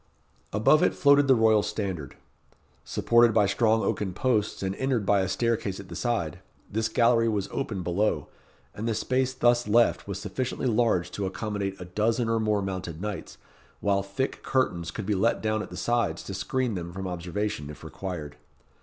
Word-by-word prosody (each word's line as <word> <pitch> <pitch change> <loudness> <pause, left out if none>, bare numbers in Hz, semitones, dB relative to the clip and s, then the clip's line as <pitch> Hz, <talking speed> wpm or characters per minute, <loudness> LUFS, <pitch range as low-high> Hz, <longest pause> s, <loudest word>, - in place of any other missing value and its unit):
Above 110 +9 +4
it - - +2
floated 140 0 +5
the 135 - +6
royal 110 -2 +4
standard. 95 -10 -4 0.7
Supported 120 -1 +3
by 105 -2 +5
strong 110 +2 +2
oaken 95 -3 -1
posts, 110 -6 0
and 95 0 -1
entered 130 -5 0
by 100 -1 +3
a 95 - 0
staircase 110 -2 -1
at 100 -1 -10
the 85 - -7
side, 85 -4 -1 0.3
this 110 +2 0
gallery 115 0 +3
was 105 -3 -1
open 105 -9 -3
below, 95 +5 0 0.5
and 110 +3 -4
the 115 - 0
space 130 +3 0
thus 120 -2 +2
left 115 0 +3
was 100 -2 -4
sufficiently 130 +4 -3
large 110 -7 +2
to 100 -2 -2
accommodate 100 -1 -3
a 90 - -6
dozen 110 +5 0
or 115 0 +2
more 105 -2 +1
mounted 95 -4 -4
knights, 105 +1 -5 0.4
while 100 -1 +1
thick 100 +7 -3
curtains 85 -10 0
could 105 +4 -5
be 105 - +1
let 110 +4 +2
down 110 0 0
at - - -7
the - - -8
sides 115 -9 0
to 95 - -6
screen 120 +5 -1
them 85 -2 -5
from 95 +2 -6
observation, 90 -3 -3
if 75 - -10
required. 80 -7 -6
105 Hz, 180 wpm, -27 LUFS, 95-115 Hz, 0.7 s, the